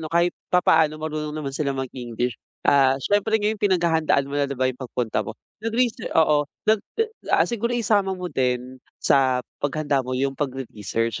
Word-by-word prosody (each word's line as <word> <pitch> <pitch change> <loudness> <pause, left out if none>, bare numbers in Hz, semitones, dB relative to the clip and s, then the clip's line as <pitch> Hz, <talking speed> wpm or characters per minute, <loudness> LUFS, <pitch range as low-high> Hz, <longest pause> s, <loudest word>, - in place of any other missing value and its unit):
'no, 155 - -5
kahit 170 +2 +2 0.2
papaano 160 -3 +4
marunong 155 -1 -4
naman 140 -3 -4
silang 140 -2 -1
mag-English. 125 -2 -3 0.3
Ah, 135 -1 +5
syempre 205 +8 +2
ngayon 210 0 -1
pinaghahandaan 165 -7 +2
mo 140 - -9
na 140 -1 +1
ba 130 - +1
yung 130 +1 -3
pagpunta 120 -4 -2
mo? 110 +2 -8 0.2
Nag-research 230 +1 0
oo. 150 -2 +4 0.2
Nag, 215 -1 +4 0.5
ah, - - +5
siguro 235 0 -2
isama 200 -5 +1
mo 180 0 -5
din 125 0 -1 0.2
sa 130 -2 +3 0.2
paghanda 145 -1 0
mo 130 0 -3
yung 135 +1 0
pagre-research. 115 -5 -3
145 Hz, 160 wpm, -24 LUFS, 130-175 Hz, 0.5 s, Ah